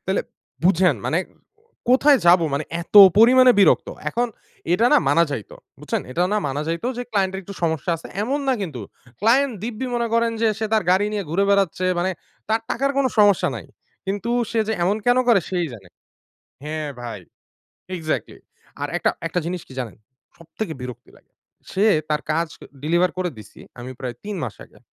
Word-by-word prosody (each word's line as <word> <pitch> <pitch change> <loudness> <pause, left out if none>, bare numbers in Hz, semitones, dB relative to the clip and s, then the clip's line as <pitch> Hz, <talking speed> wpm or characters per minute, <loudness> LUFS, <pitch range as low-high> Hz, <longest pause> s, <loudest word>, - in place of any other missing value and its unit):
তাইলে - - 0 0.4
বুঝেন 180 -4 +3
মানে 165 - +1 0.7
কোথায় 270 +2 +5
যাবো? 170 -1 +6
মানে 145 - -1 0.2
এত 175 - -11 0.2
পরিমাণে 255 +3 +7
বিরক্ত! 190 - +4 0.2
এখন 240 +8 0 0.5
এটা 230 +6 +3
না - - +7
মানা 155 +5 +4
যাইত। 115 -7 -5 0.3
বুঝছেন? - - -2
এটা 170 - -1
না 210 - +2
মানা 140 +2 -2
যাইত 165 +4 -3
যে 245 - -3
ক্লায়েন্টের 190 -2 0
একটু 200 - -9
সমস্যা 160 +1 0
আছে। - - -11 0.2
এমন 275 +5 -1
না 265 - +3
কিন্তু। 145 - -5 0.4
ক্লায়েন্ট 250 +5 +3
দিব্যি 240 +2 -4
মনে 235 -1 0
করেন 230 0 +2
যে 225 - +4
সে 220 - -1
তার 215 - +3
গাড়ি 195 +3 +3
নিয়ে 205 -2 -2
ঘুরে 190 +5 +1
বেড়াচ্ছে। 195 -2 +1
মানে 190 +2 0 0.4
তার 220 +1 +1
টাকার 275 +3 0
কোনো 265 -2 +2
সমস্যা 205 -3 +5
নাই। - - -8 0.4
কিন্তু 205 +4 -3 0.2
সে 230 - 0
যে 220 - 0
এমন 200 +4 +1
কেন 245 +1 +4
করে? 230 -5 +6
সেই 175 -2 0
জানে 95 -5 -12 0.8
হ্যাঁ, 155 0 -4
ভাই। 115 -4 -6 0.8
এক্সাক্টলি। 155 -2 -4 0.4
আর - - -1
একটা - - +1 0.2
একটা 175 +2 -1
জিনিস 175 -1 -4
কি - - -13
জানেন? 115 -7 -5 0.4
সবথেকে 170 +2 -6
বিরক্তি 125 -1 -9
লাগে। - - -33 0.4
সে 195 +3 +1 0.2
তার 150 -1 -1
কাজ 165 +1 0
ক - - -19 0.2
ডেলিভার 175 +4 +2
করে 180 -2 -1
দিছি 105 - -14 0.2
আমি 125 +2 -7
প্রায় 125 -2 -4
৩ 205 -2 -4
মাস 115 - -6
আগে। - - -22
185 Hz, 185 wpm, -22 LUFS, 160-225 Hz, 0.8 s, পরিমাণে